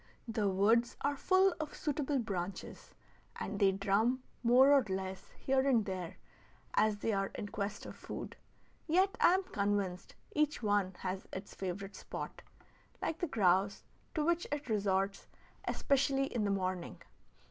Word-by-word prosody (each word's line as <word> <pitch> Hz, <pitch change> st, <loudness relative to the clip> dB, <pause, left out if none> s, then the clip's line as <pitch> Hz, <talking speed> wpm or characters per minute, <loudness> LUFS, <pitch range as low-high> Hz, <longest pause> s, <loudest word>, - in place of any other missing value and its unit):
The 215 Hz, -3 st, 0 dB
woods 220 Hz, +5 st, +3 dB
are 285 Hz, +1 st, +1 dB
full 375 Hz, +5 st, +4 dB
of 310 Hz, -1 st, -4 dB
suitable 290 Hz, -1 st, -1 dB
branches, 195 Hz, -6 st, -5 dB, 0.4 s
and -, -, -4 dB
they 195 Hz, -2 st, +5 dB
drum 210 Hz, +6 st, +1 dB, 0.2 s
more 255 Hz, +3 st, +6 dB
or 280 Hz, -2 st, +6 dB
less 190 Hz, 0 st, -4 dB
here 265 Hz, 0 st, +2 dB
and 230 Hz, -5 st, +3 dB
there 185 Hz, -3 st, -5 dB, 0.6 s
as 215 Hz, -1 st, +3 dB
they 220 Hz, +2 st, -1 dB
are 195 Hz, 0 st, +1 dB
in 205 Hz, -, -5 dB
quest 200 Hz, 0 st, -4 dB
of -, -, -8 dB
food; -, -, -7 dB, 0.5 s
yet 375 Hz, +5 st, +3 dB
I 355 Hz, -, +7 dB
am 380 Hz, -, 0 dB
convinced 200 Hz, -, -2 dB, 0.2 s
each 300 Hz, -4 st, +1 dB
one 205 Hz, -3 st, +1 dB
has 185 Hz, 0 st, -4 dB
its 190 Hz, +2 st, -7 dB
favorite 195 Hz, +1 st, -5 dB
spot, -, -, -7 dB, 0.6 s
like 325 Hz, -, -2 dB
the 350 Hz, -, 0 dB
grouse, 195 Hz, -, +2 dB, 0.3 s
to 305 Hz, -2 st, +1 dB
which 345 Hz, +1 st, +1 dB
it 290 Hz, -3 st, -3 dB
resorts, 195 Hz, -2 st, 0 dB, 0.4 s
especially 275 Hz, 0 st, +2 dB
in 225 Hz, -4 st, 0 dB
the -, -, +1 dB
morning. 185 Hz, -2 st, -2 dB
210 Hz, 150 wpm, -34 LUFS, 195-275 Hz, 0.6 s, I